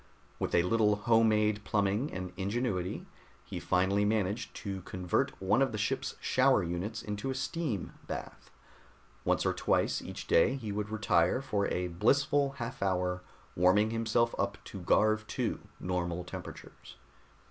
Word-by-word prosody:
With - - -1
a 85 - +5
little 105 +2 +3
home 115 +2 +4
made 105 -1 +2
plumbing 105 +6 0
and 90 -1 -5
ingenuity, 100 -1 -2 0.4
he - - -5
finally 95 +3 +2
managed 105 +1 0
to 95 -2 -5
convert 90 -1 -1
one 100 +6 +2
of 135 - +3
the 110 - -3
ship's 130 +6 -1
shower 130 -5 +3
units 90 +6 -3
into 105 +5 -4
a 130 - -2
steam 135 - -3
bath. - - -7 0.7
Once - - +1
or - - +2
twice - - +1
each - - -7
day 120 +10 +4
he 115 -6 -5
would 105 +1 -3
retire 105 -3 +2
for 100 -7 -1
a 90 0 -1
blissful 140 - +2
half 125 0 -6
hour 90 -1 0 0.3
warming 100 +5 +4
himself 115 +1 +1
up 100 0 0
to 100 - -8
Garv 110 +4 +3
II - - 0 0.2
normal 90 -1 -2
temperatures. 90 - -10
105 Hz, 150 wpm, -31 LUFS, 95-115 Hz, 0.7 s, a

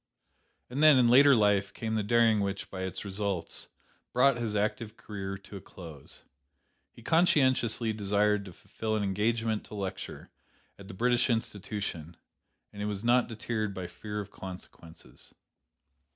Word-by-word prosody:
"And 135 +4 -2
then, 155 -3 +8
in 120 -2 +5
later 140 +3 +7
life, 100 -2 +2
came 110 -1 -3
the 110 - +1
daring 115 +1 +3
which, 100 -1 -3
by 95 - -5
its 95 +2 -4
results, 100 -4 -3 0.5
brought 125 +2 +4
his 115 -3 -2
active 110 +2 -2
career 95 -2 -6
to 100 +1 -11
a - - -10
close. 80 -7 -11 0.7
He 115 - -16
conscientiously 130 - +2
desired 105 0 +1
to 95 - -9
fulfil 110 +5 -4
an 105 - 0
engagement 110 +2 0
to - - -10
lecture 95 -2 -6 0.5
at 100 - -11
the 95 - -9
British 120 +4 +2
Institution, 100 -7 -3 0.6
and 105 0 -4
was 105 0 -4
not 120 +1 +3
deterred 110 -2 -3
by 95 - -4
fear 105 +3 -6
of 100 -1 -7
consequences. 90 -3 -12
105 Hz, 150 wpm, -29 LUFS, 100-115 Hz, 0.7 s, then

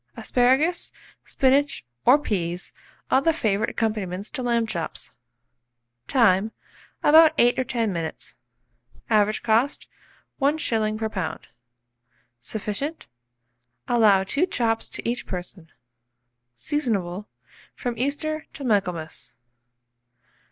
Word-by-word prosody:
Asparagus, 265 +8 +2 0.3
spinach, 275 - +1 0.2
or 255 +4 +8
peas 180 - -3 0.4
are 265 - +5
the 330 - +3
favourite 215 -10 0
accompaniments 205 -4 -3
to 265 - -4
lamb 235 -2 +1
chops. 170 -7 -5 1.0
Time. 220 -4 +3 0.5
About 315 +1 +7
8 245 +1 +4
or - - +2
10 230 -4 -1
minutes. 165 -2 -5 0.8
Average 215 0 +2
cost, 230 +5 +1 0.5
1s. 225 -7 +1
per 220 0 -1
lb. 180 -7 -4 1.0
Sufficient. 220 - -4 0.8
Allow 210 -5 +4
2 285 - +1
chops 225 -7 0
to - - -5
each 240 +1 -2
person. 180 -2 -6 0.8
Seasonable 205 - -2 0.5
from 245 -2 -3
Easter 300 +5 -2
to 285 - -8
Michaelmas. 180 -9 -2
225 Hz, 100 wpm, -24 LUFS, 195-270 Hz, 1.0 s, or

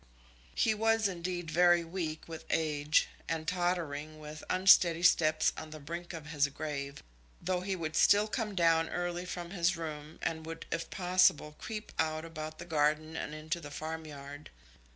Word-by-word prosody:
He 220 - +3
was, 225 0 +2
indeed, 175 -2 -4
very 175 +1 +5
weak 165 -2 -4
with 165 -1 -8
age, 150 -1 +2 0.2
and 160 -1 -2
tottering 165 -4 -1
with 150 0 -9
unsteady 180 -2 +5
steps 155 -3 +4
on 155 - -7
the 155 0 -9
brink 170 +4 -6
of 165 -3 -7
his 150 -2 +1
grave, 140 -1 -5 0.4
though 180 0 -1
he 190 +1 -2
would 160 -3 -4
still 205 +1 +5
come 215 -2 -3
down 165 -2 +3
early 175 0 -3
from 175 -1 -5
his 175 -1 +1
room, 155 -1 -6
and 160 -1 -2
would, 165 0 -6
if 165 0 -2
possible, 180 -5 +3
creep 215 -1 -6
out 155 0 0
about 155 -1 -7
the 175 - -8
garden 155 0 +1
and 150 - -4
into 155 +3 -3
the 145 - -8
farmyard. 150 -2 -7
165 Hz, 165 wpm, -32 LUFS, 155-175 Hz, 0.4 s, very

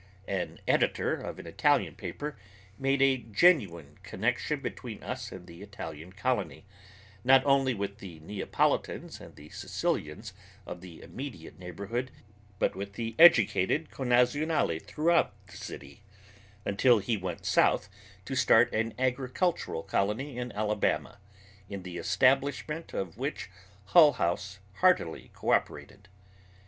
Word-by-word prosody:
An 95 -3 -3
editor - - +2
of - - -5
an - - -10
Italian - - +2
paper 150 -1 -6 0.4
made 135 0 +2
a 135 -1 +4
genuine 105 - +2
connection - - -1
between - - -7
us - - -5
and 90 -1 -9
the 85 +1 -13
Italian 90 -5 -8
colony, 105 +1 -2 0.6
not 130 +1 +6
only 135 -2 +3
with 100 0 -4
the 90 -6 -9
Neapolitans 100 +6 -1
and - - -12
the 75 +1 -13
Sicilians 75 0 -3 0.3
of 90 - -8
the 90 -3 -12
immediate 125 - -8
neighborhood, 100 +8 -4 0.5
but - - 0
with 100 +1 -6
the 115 +2 -4
educated 155 - +5
connazionali 125 - +1
throughout 150 - +1
the - - -15
city, 70 +6 -9 0.6
until 120 +5 +4
he 105 +3 -1
went 90 -4 -5
south - - +3 0.4
to - - -5
start 120 -1 +4
an 115 0 -1
agricultural 130 - -1
colony 110 +8 -1
in 125 0 -4
Alabama, 105 -1 -1 0.5
in 100 -2 -6
the 90 -1 -7
establishment 135 - +1
of 95 +2 -5
which 135 -7 -4 0.4
Hull 155 0 +7
House 90 +3 -2 0.2
heartily 180 - +2
cooperated. 100 - -1
110 Hz, 125 wpm, -29 LUFS, 95-135 Hz, 0.6 s, Hull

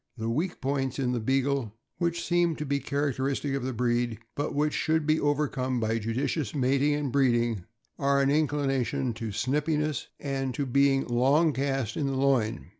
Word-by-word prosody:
The 115 0 -2
weak 165 +9 -2
points 135 -1 -1
in 130 -3 0
the 125 - 0
Beagle, 135 +4 +1
and 110 -4 -8 0.3
which 170 -1 0
seem 175 -2 +2
to 150 - -4
be 140 0 0
characteristic 140 -1 -1
of 135 - -1
the 130 - -2
breed, 120 -1 0 0.2
but 145 - -3
which 150 +1 +1
should 160 -1 +1
be 155 +1 +3
overcome 135 -3 0
by 115 0 0
judicious 125 +4 -2
mating 140 +2 +2
and 145 -3 -2
breeding, 120 -7 +2 0.3
are 140 0 +2
an 140 0 +3
inclination 140 -3 0
to 115 0 -5
snipiness 150 +6 -1
and 135 -3 -2
to 140 - -1
being 135 +1 +3
long 140 +6 +3
cast 135 -4 -1
in 145 - 0
the 135 - -1
loin. 130 -7 +1
135 Hz, 180 wpm, -28 LUFS, 125-145 Hz, 0.3 s, be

